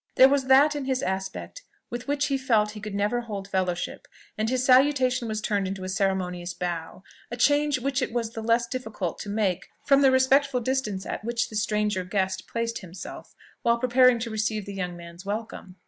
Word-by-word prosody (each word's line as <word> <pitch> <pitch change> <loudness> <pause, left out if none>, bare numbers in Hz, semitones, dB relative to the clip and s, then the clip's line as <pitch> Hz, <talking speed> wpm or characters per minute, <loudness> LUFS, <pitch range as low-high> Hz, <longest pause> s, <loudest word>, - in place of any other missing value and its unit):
There 260 - +8
was 275 -1 +1
that 280 +3 +5
in 285 -2 -3
his 260 -1 -1
aspect 190 - -4 0.3
with 240 +2 -5
which 285 0 +1
he 275 - 0
felt 225 -5 +2
that - - -8
he 215 - -8
could 210 -1 -6
never 210 +4 0
hold 205 -4 -6
fellowship, 185 -2 -2 0.3
and 215 +1 -1
his 255 0 0
salutation 255 -2 +4
was 215 -1 -3
turned 205 -3 0
into 190 0 -5
a 185 - -4
ceremonious 185 -2 -1
bow; 175 0 -4 0.3
a 240 - -5
change 290 +2 +3
which 270 +1 -1
it 255 - -1
was 230 -1 -2
the 225 - -6
less 230 +1 +2
difficult 220 -8 -4
to 205 - -6
make, 200 -4 -1 0.2
from 275 0 +5
the 270 - +6
respectful 260 +1 +3
distance 240 -6 -2
at - - -5
which 235 +1 -1
the 215 - -9
stranger 210 -2 0
guest 190 0 -2
placed 230 0 -2
himself, 180 -1 -10 0.3
while 235 0 +3
preparing 255 0 +4
to 230 0 -4
receive 215 -1 -1
the 200 - -7
young 180 -2 -4
man's 170 +1 -11
welcome. 200 -2 -5
220 Hz, 205 wpm, -26 LUFS, 195-255 Hz, 0.3 s, There